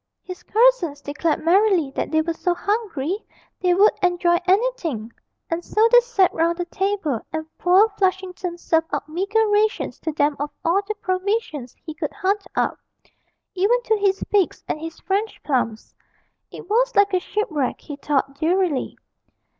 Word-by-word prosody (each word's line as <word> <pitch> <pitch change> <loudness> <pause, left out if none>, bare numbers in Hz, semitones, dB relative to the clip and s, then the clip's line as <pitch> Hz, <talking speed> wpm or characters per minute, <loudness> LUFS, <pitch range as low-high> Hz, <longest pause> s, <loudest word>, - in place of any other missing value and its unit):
His 365 -1 -8
cousins 440 -11 +2
declared 295 +3 -2
merrily 365 -5 +3
that - - -3
they 315 0 +2
were 335 +1 -2
so 350 +1 -1
hungry 405 - -2 0.4
they 360 -1 +2
would 405 +3 +6
enjoy 350 -1 +2
anything, 365 - 0 0.3
and 335 +1 -3
so 435 +5 +3
they - - +9
sat 465 -7 +2
round 335 +1 +1
the 350 - -2
table 370 - -2
and 315 0 -3
poor 370 +4 +5
Flushington 370 -2 -1
served 325 -1 +1
out - - -3
meagre 400 +7 0
rations 425 +2 +1
to 320 - -3
them 290 -1 +1
of 290 +1 -2 0.2
all 350 +4 +3
the 430 - -2
provisions 370 - -2
he 315 - -6
could 310 -2 -4
hunt 400 0 -1
up, - - 0 0.7
even 400 +6 +2
to 440 - +2
his 395 -2 +1
figs 405 -4 +1
and - - -2
his 325 0 -7
French 405 +3 -2
plums. 240 -6 -2 0.6
It - - -11
was - - +1
like 405 -1 +4
a 370 - +3
shipwreck, 335 -9 -2
he 290 - -8
thought 275 -1 -1
drearily. 335 -3 0
360 Hz, 160 wpm, -22 LUFS, 315-410 Hz, 0.7 s, they